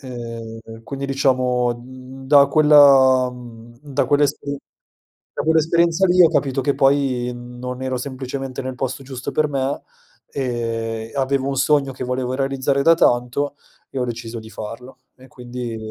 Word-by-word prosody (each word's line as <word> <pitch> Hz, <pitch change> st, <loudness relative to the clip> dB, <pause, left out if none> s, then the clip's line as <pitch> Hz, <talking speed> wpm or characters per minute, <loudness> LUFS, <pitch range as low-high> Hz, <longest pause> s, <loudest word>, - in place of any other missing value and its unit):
Ehm, 115 Hz, -3 st, -8 dB
quindi 140 Hz, +3 st, -6 dB
diciamo, 130 Hz, -3 st, +1 dB
mhmm, 130 Hz, +2 st, -12 dB
da 140 Hz, 0 st, +6 dB
quella, 140 Hz, -4 st, +6 dB
mhmm, 120 Hz, -1 st, -12 dB
da 145 Hz, -3 st, -1 dB
quell'esperi 145 Hz, 0 st, 0 dB, 0.8 s
da -, -, -2 dB
quell'esperienza 165 Hz, +3 st, +3 dB
lì 180 Hz, 0 st, +5 dB
ho 170 Hz, -, +7 dB
capito 135 Hz, -4 st, 0 dB
che 140 Hz, +2 st, +1 dB
poi, 135 Hz, -3 st, +1 dB
mhmm, 120 Hz, 0 st, -11 dB
non 125 Hz, +1 st, -6 dB
ero 130 Hz, -1 st, -2 dB
semplicemente 130 Hz, 0 st, -5 dB
nel 130 Hz, 0 st, -5 dB
posto 130 Hz, +1 st, -4 dB
giusto 130 Hz, -1 st, -6 dB
per 155 Hz, -1 st, +1 dB
me, 135 Hz, 0 st, -2 dB, 0.5 s
ehm, 115 Hz, -3 st, -3 dB
avevo 135 Hz, 0 st, 0 dB
un 135 Hz, -, -2 dB
sogno 140 Hz, 0 st, +2 dB
che 125 Hz, -, -6 dB
volevo 125 Hz, 0 st, -2 dB
realizzare 135 Hz, +1 st, 0 dB
da 165 Hz, +3 st, +6 dB
tanto 125 Hz, 0 st, +1 dB, 0.3 s
e 135 Hz, -, -6 dB
ho 125 Hz, -, 0 dB
deciso 120 Hz, -1 st, -6 dB
di 110 Hz, 0 st, -10 dB
farlo 125 Hz, +5 st, -9 dB, 0.2 s
e 130 Hz, -, -16 dB
quindi 125 Hz, -2 st, -7 dB
130 Hz, 155 wpm, -20 LUFS, 125-140 Hz, 0.8 s, ho